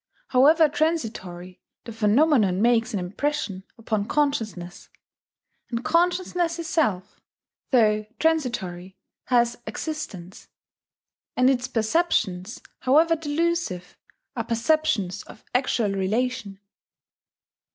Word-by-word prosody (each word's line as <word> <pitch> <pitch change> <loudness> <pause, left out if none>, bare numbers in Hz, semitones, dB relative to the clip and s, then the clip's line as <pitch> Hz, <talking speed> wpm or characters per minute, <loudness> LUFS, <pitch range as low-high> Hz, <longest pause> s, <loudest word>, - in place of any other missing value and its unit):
However 305 +5 +5
transitory, 215 - -3 0.2
the 230 - -8
phenomenon 215 - +3
makes 230 0 +2
an 205 - -2
impression 195 +1 -3
upon 215 -2 -2
consciousness; 220 -12 -2 0.8
and 235 0 -4
consciousness 350 0 +1
itself, 255 - -1 0.5
though 215 -4 +3
transitory, 205 - -1 0.3
has 240 -1 +2
existence; 220 - -6 0.9
and 255 +1 +5
its 255 -1 -1
perceptions, 225 - 0 0.2
however 315 +6 +4
delusive, 315 - -2 0.4
are 230 - -2
perceptions 230 - 0
of - - -14
actual 245 -4 +1
relation. 210 +2 -2
235 Hz, 90 wpm, -24 LUFS, 200-305 Hz, 0.9 s, However